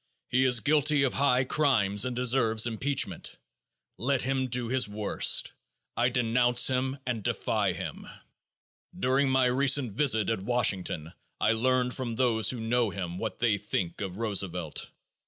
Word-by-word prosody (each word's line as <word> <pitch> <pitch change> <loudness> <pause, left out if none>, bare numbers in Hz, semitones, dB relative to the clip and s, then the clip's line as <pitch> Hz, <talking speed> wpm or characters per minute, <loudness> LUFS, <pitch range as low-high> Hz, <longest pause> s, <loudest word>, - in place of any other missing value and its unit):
He 130 +2 +2
is 125 -3 +3
guilty 150 0 +3
of 135 - +1
high 130 -2 +2
crimes 120 -8 +2
and 125 -1 -3
deserves 115 -3 +2
impeachment. 125 +4 -3 0.6
Let 130 +4 0
him 130 0 -1
do 125 -1 -2
his 125 -2 0
worst. 105 0 +1 0.4
I 120 +1 +2
denounce 120 0 +2
him 130 +1 -1
and 120 -3 -3
defy - - -1
him. - - -7 0.9
During 135 +2 +1
my 130 -1 +3
recent 130 0 +2
visit 110 -4 +2
at 110 -4 -2
Washington 95 -8 -1 0.3
I 105 - +2
learned 125 +2 +1
from 120 -4 -4
those 110 -4 +2
who 125 - -1
know 115 0 0
him 90 -1 -6
what 110 - -4
they 110 -4 +1
think 95 -4 -3
of 95 -2 -5
Roosevelt. 95 -7 -2
120 Hz, 150 wpm, -28 LUFS, 110-130 Hz, 0.9 s, is